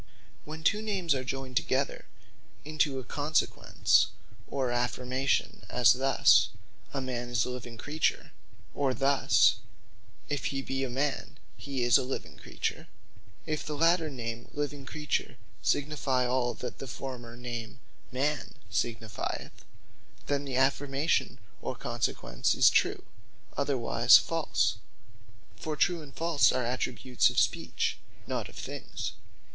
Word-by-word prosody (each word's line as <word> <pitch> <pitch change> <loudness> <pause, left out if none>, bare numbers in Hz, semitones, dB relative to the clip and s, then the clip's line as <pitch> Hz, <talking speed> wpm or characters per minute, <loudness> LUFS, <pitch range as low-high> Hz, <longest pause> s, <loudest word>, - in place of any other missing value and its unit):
When 155 +1 -8
two 210 +6 +3
Names 195 -7 0
are 130 -1 -2
joyned 130 -1 -3
together 135 +2 0 0.6
into 150 -2 +1
a 130 - -4
Consequence, 150 +4 +2 0.4
or 130 -3 -1
Affirmation; 125 +2 0
as 125 -2 +6
thus, 135 +2 +5 0.4
A 140 - -2
Man 125 -2 -3
Is 120 -2 +1
A 125 - -3
Living 120 -2 -7
Creature; 150 +7 -1 0.4
or 135 -2 0
thus, 140 0 +4 0.7
If 145 -2 -2
He 135 -1 -1
Be 135 0 -2
A 135 - -2
Man, 140 +2 -2 0.2
He 135 -3 -3
Is 120 +2 +6
A - - -1
Living 130 +1 -5
Creature, - - -4 0.6
If 155 -1 -2
the 150 - -4
later 165 0 +3
name 120 -3 -5
Living 145 -2 -3
Creature, 150 -4 -2 0.2
signifie 140 -3 +1
all 125 -1 +1
that 125 - -6
the 135 - -6
former 125 -2 -7
name 120 -1 -6 0.3
Man 140 +3 -1 0.2
signifieth, 110 -3 -3 0.6
then 145 0 -1
the 135 -2 -3
affirmation, 135 +3 +1 0.2
or - - -3
consequence - - -1
is - - +6
True; - - +2 0.5
otherwise 125 -4 +5
False. 150 -11 0 0.8
For 155 +6 -3
True 170 +2 +2
and 145 -2 -11
False 165 -3 +4
are 125 - 0
attributes 125 0 +1
of - - -7
Speech, - - 0 0.3
not - - -3
of - - -15
things. - - -5
135 Hz, 130 wpm, -30 LUFS, 125-145 Hz, 0.8 s, as